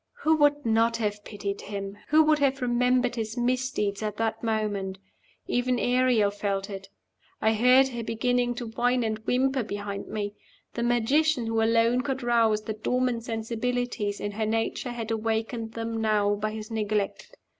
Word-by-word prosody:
Who 320 +1 +4
would 290 -1 +3
not 230 +1 +3
have 210 -2 -2
pitied 200 -2 -5
him? 200 -1 -5
Who 310 +1 +5
would 305 -1 +3
have 275 -2 +1
remembered 250 0 +2
his 220 +1 -3
misdeeds 245 -5 0
at 210 -1 -3
that 225 -1 -1
moment? 205 -4 -1 0.5
Even 250 0 0
Ariel 245 -4 +3
felt 200 0 -2
it. 195 -1 -8 0.5
I 220 0 +3
heard 250 +4 +5
her 240 -2 -5
beginning 245 +2 0
to 245 - -5
whine 245 +2 +1
and 220 -1 -2
whimper 265 +1 +2
behind 205 -2 -5
me. 205 -1 -3 0.4
The 235 - -3
magician 240 +4 +2
who 225 0 0
alone 230 +2 +3
could 265 -1 -3
rouse 225 -3 +2
the 220 - -3
dormant 240 +2 -1
sensibilities 230 -1 -2
in 205 - -3
her 215 +2 -2
nature 225 +3 -1
had 230 -2 -4
awakened 225 +1 -2
them 225 0 -3
now 210 -2 +2
by 210 +1 -2
his 215 +1 -7
neglect. 210 -2 -2
225 Hz, 165 wpm, -27 LUFS, 215-245 Hz, 0.5 s, Who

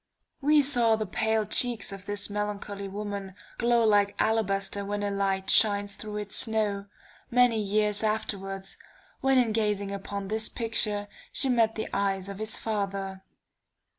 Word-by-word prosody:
We 295 +1 +4
saw 240 -5 +5
the 215 0 -3
pale 220 +2 0
cheeks 235 -2 +1
of 195 0 -9
this 205 0 0
melancholy 205 -1 -4
woman, 200 -1 -6 0.2
glow 235 -1 +3
like 205 -2 +3
alabaster 200 -2 0
when 205 +1 -3
a 205 - -1
light 195 -1 0
shines 205 -2 +3
through 210 -1 -6
its 205 -1 -3
snow, 210 -3 +2 0.4
many 245 -2 +3
years 210 0 +2
afterwards, 195 -3 -3 0.4
when 270 0 +2
in 240 -3 +3
gazing 210 -2 -1
upon 200 0 -5
this 215 +2 -2
picture, 215 -3 -1 0.2
she 270 - 0
met 230 -3 +2
the 220 - -3
eyes 195 -1 -1
of 200 0 -7
his 215 0 +2
father. 195 -3 -3
210 Hz, 150 wpm, -27 LUFS, 200-220 Hz, 0.4 s, saw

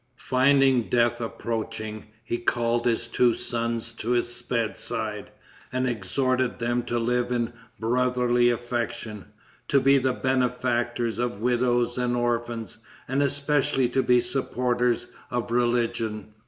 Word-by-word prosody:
Finding 130 -2 +3
death 120 0 +2
approaching, 110 -2 -4 0.2
he 120 +1 -2
called 120 0 +1
his 115 -1 +1
two 120 0 +2
sons 115 -1 -2
to 115 0 -6
his 120 0 -1
bedside, 115 -2 -3 0.4
and 130 +1 0
exhorted 125 +4 0
them 120 0 0
to 120 0 -2
live 120 +1 0
in 120 -1 -1 0.3
brotherly 125 +1 +2
affection, 115 -3 -3 0.4
to 140 - +4
be 135 +1 +5
the 130 0 +1
benefactors 120 -3 0
of 120 -4 -2
widows 120 +1 +1
and 120 0 +1
orphans, 120 -2 -2 0.3
and 135 +2 +1
especially 140 -2 +2
to 130 +2 +2
be 125 -1 +4
the - - -5
supporters 125 -3 0 0.2
of 120 -1 -3
religion. 115 -3 0
120 Hz, 125 wpm, -26 LUFS, 115-125 Hz, 0.4 s, be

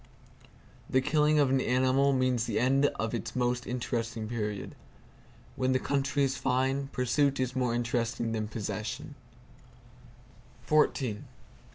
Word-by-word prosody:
The 130 - +3
killing 150 +2 +2
of 140 -3 +3
an 135 -1 +3
animal 130 +3 +3
means 130 -3 +1
the 115 - -2
end 135 +3 +3
of 110 0 -3
its - - -4
most 125 0 0
interesting 115 -2 -3
period. 105 -3 -4 0.8
When 130 0 +1
the 130 - +2
country 140 +1 0
is 135 -1 +1
fine, 130 +2 0
pursuit 135 +1 +1
is 130 0 -1
more 125 -2 0
interesting 120 -1 -1
than 110 -1 -2
possession. 120 +7 -5
125 Hz, 125 wpm, -29 LUFS, 115-135 Hz, 0.8 s, The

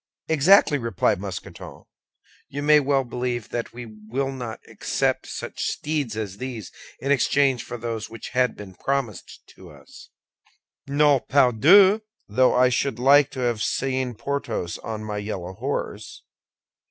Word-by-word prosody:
"Exactly!" 160 0 +5
replied 105 -4 0
Mousqueton. 95 -6 -8 0.7
"You 145 +1 -5
may 150 0 +6
well 140 -1 +1
believe 120 -2 -4
that 120 -1 -4
we 120 0 -8
will 110 +5 -4
not 120 -4 -6
accept - - -1
such - - -6
steeds 145 -8 -2
as 100 -3 -4
these 120 -5 -6 0.3
in 140 - -2
exchange 140 -2 +2
for 120 - -7
those 115 -2 -5
which 115 -1 -8
had 125 0 +1
been 100 -2 -10
promised 135 0 -3
to - - -14
us." - - -15 0.8
"No, 145 0 +4
pardieu; 155 - +5 0.3
though 125 +5 +3
I 125 0 +5
should 125 -1 -1
like 140 +2 +5
to 130 - -5
have 120 -3 0
seen 130 +1 -1
Porthos 115 -8 -3
on 110 -1 -6
my 105 -1 -4
yellow 95 -3 -5
horse. - - -5
125 Hz, 140 wpm, -24 LUFS, 110-140 Hz, 0.8 s, may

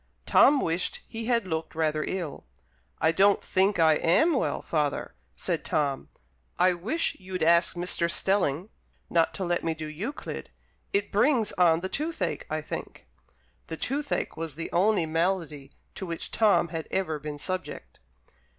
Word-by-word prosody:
Tom 285 0 +6
wished 165 +2 -1
he 225 0 -5
had 230 -3 +1
looked 160 -2 -4
rather 155 -1 0
ill. 175 -6 -4 0.6
"I 160 - +4
don't 195 +4 +4
think 195 +2 +2
I 160 -2 +5
am 315 - +3
well, 265 - -1
father," 150 -3 -1 0.2
said - - -2
Tom; 140 -3 -1 0.5
"I 180 +1 +4
wish 220 - -1
you'd 185 -2 -4
ask 170 +2 +4
Mr. 175 -1 -1
Stelling 190 -1 0 0.4
not 165 -1 +3
to 190 - -3
let 175 0 0
me 165 -1 -1
do 160 0 -6
Euclid 180 - -6 0.4
it 200 +1 0
brings 225 +1 +3
on 170 -2 +3
the 190 - -2
toothache, 295 - -3
I 155 0 -2
think." - - -7 0.6
(The 160 - -5
toothache 285 - -2
was 160 -2 -5
the 165 - -5
only 190 0 +3
malady 160 -4 -1 0.2
to 190 - -6
which 165 -1 -5
Tom 210 -6 +3
had 165 -1 -5
ever 160 -6 -1
been 150 0 -6
subject.) 185 +4 -5
175 Hz, 155 wpm, -27 LUFS, 160-200 Hz, 0.6 s, Tom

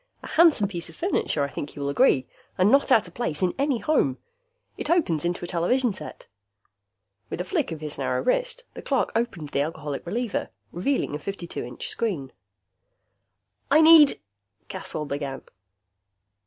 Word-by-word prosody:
A - - -7
handsome 315 -11 +5
piece 175 -4 -4
of - - -13
furniture, 335 - 0
I 140 - -2
think 145 - -7
you 145 - -7
will 140 - -1
agree, 140 - +3 0.3
and 185 +3 +4
not 275 0 +4
out 220 -7 +5
of 175 - -14
place 185 -9 -2
in 180 - +2
any 280 -2 +1
home. 225 - +1 0.6
It - - -5
opens 295 - +2
into 175 0 -2
a - - -7
television 210 +8 +1
set." 155 -5 -9 1.0
With - - -5
a - - -1
flick 180 - -1
of 160 -1 -6
his 150 -1 -4
narrow - - -1
wrist, - - 0
the - - -8
clerk 270 -3 0
opened 210 -10 -2
the 140 - 0
Alcoholic 150 -2 -4
Reliever, 230 +5 -2 0.2
revealing 195 - -1
a 150 - -3
52 180 0 -5
inch 125 0 -6
screen. 165 - -2 1.4
"I 300 - +6
need 315 -3 +8 0.2
" 100 0 -47
Caswell 150 - -3
began. 140 -2 -4
180 Hz, 170 wpm, -25 LUFS, -, 1.4 s, need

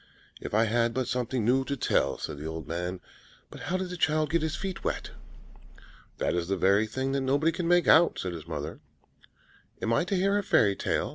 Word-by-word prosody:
"If - - -5
I 110 - +5
had 115 +1 +1
but 130 -2 -1
something 125 -2 -1
new 130 +3 +3
to 140 +1 -3
tell," - - +1
said 70 - -6
the 75 - -5
old 80 0 -6
man. 90 +2 -4 0.5
"But - - -10
how 185 - +1
did 185 -1 -4
the 180 - -5
child 155 -1 +1
get 170 0 +2
his 160 -1 -1
feet 190 -2 -5
wet?" - - -3 1.1
"That - - 0
is 85 -1 -1
the 95 +1 0
very 100 +4 +3
thing 130 +4 -2
that 135 0 0
nobody 140 +5 +2
can 165 +1 -3
make 175 0 +4
out," 165 +2 +6
said 90 -1 -3
his 80 -1 -8
mother. 75 -1 -5 1.0
"Am 115 - 0
I 115 - +3
to 195 - -1
hear 195 +2 +2
a - - -3
fairy 100 - +3
tale?" - - -1
125 Hz, 220 wpm, -28 LUFS, 95-160 Hz, 1.1 s, out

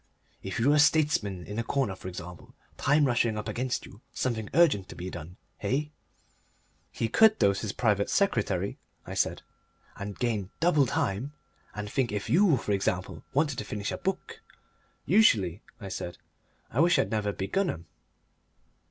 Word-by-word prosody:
"If 95 +1 -4
you 120 +5 +3
were 150 - +5
a - - +4
statesman 145 - +2
in 105 +2 -5
a - - 0
corner, 115 -5 -1
for 95 - -9
example, 90 -1 -9 0.2
time 145 +1 +3
rushing 120 -4 +1
up 105 0 -4
against 125 +4 -2
you, 100 - -14
something 110 -4 -2
urgent 145 - +4
to - - -9
be 90 +1 -6
done, 85 +3 -9 0.2
eh?" 135 +8 0 1.0
"He 115 - -1
could 220 - +5
dose 100 -1 +2
his 105 - -2
private 105 -4 +1
secretary," 100 - 0 0.3
I - - -7
said. - - 0 0.5
"And 100 0 -6
gain 110 -6 -1
double 155 -6 +4
time. 115 +7 -1 0.4
And 105 0 -4
think 120 +3 0
if 105 -1 -3
YOU, 175 -4 +5
for 105 - -3
example, 95 -3 -1
wanted 145 -3 +1
to - - -3
finish 105 -1 -4
a - - -3
book." 445 - -4 0.6
"Usually," 100 - +4 0.2
I 100 -4 -7
said, 90 -1 -5 0.5
"I 120 - -2
wish 170 +2 +5
I'd - - +1
never 105 -2 0
begun 175 - -1
'em." 85 - -5
110 Hz, 170 wpm, -28 LUFS, 100-145 Hz, 1.0 s, were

